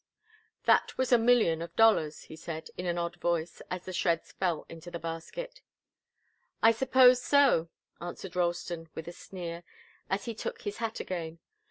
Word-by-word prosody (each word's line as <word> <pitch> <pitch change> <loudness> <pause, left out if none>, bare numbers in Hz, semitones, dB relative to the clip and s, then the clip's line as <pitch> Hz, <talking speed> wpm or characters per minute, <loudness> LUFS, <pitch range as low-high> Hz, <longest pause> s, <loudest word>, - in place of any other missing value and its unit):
"That - - +3
was 260 0 0
a 245 - +7
million 225 -9 +4
of 170 0 -7
dollars," 210 -9 +4
he - - -11
said, 160 0 -7
in 180 - -4
an 175 0 0
odd 170 0 -2
voice, 170 -1 -1
as 180 -1 -4
the 185 - -6
shreds 170 -2 0
fell 175 -5 -1
into 165 +1 -10
the 170 - -5
basket. 335 - -6 1.0
"I 225 - +8
suppose 255 +1 +5
so," 275 - +4 0.3
answered 175 +1 -7
Ralston, 170 -2 -1
with 160 - -6
a - - -5
sneer, 175 -1 -7 0.5
as 195 +1 -1
he 235 - -3
took 220 - -5
his 205 -1 -4
hat 225 -1 -3
again. 165 -3 -5
175 Hz, 170 wpm, -30 LUFS, 165-225 Hz, 1.0 s, I